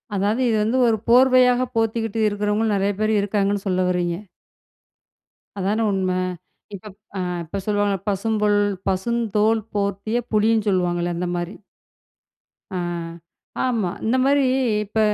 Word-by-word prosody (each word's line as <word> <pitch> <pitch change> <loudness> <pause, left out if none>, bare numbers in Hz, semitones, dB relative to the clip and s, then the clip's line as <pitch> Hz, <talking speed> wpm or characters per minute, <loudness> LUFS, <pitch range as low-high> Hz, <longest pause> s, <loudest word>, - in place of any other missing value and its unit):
அதாவது 205 +5 0
இது 220 - +2
வந்து 225 +4 0
ஒரு 225 -1 +2
போர்வையாக 255 0 +5
போத்திக்கிட்டு 225 -1 -1
இருக்கிறவங்களும் 210 +1 0
நெறைய 200 +1 +1
பேர் 215 0 +1
இருக்காங்கன்னு 200 0 -1
சொல்ல 185 -1 +1
வரீங்க. 175 -1 0 1.4
அதானே 205 +4 0
உண்மை. 185 -1 0 0.6
இப்ப 200 - -12 0.3
அ - - -2 0.2
இப்ப 170 +5 -5
சொல்லுவாங்கல, 205 -2 0
பசுந்தோல் 210 +1 +1 0.3
பசுந்தோல் 220 +2 +1
போர்த்திய 200 +3 -1 0.2
புலின்னு 215 0 +2
சொல்லுவாங்கல்ல, 175 -2 0
அந்த 180 +1 -2
மாரி. 175 +2 -5 1.2
ஆ. - - -1 0.9
ஆமா. 230 -7 0 0.2
இந்த 225 +3 +2
மாரி, 280 0 +3 0.4
இப்ப 210 +2 -3
210 Hz, 120 wpm, -22 LUFS, 195-225 Hz, 1.4 s, போர்வையாக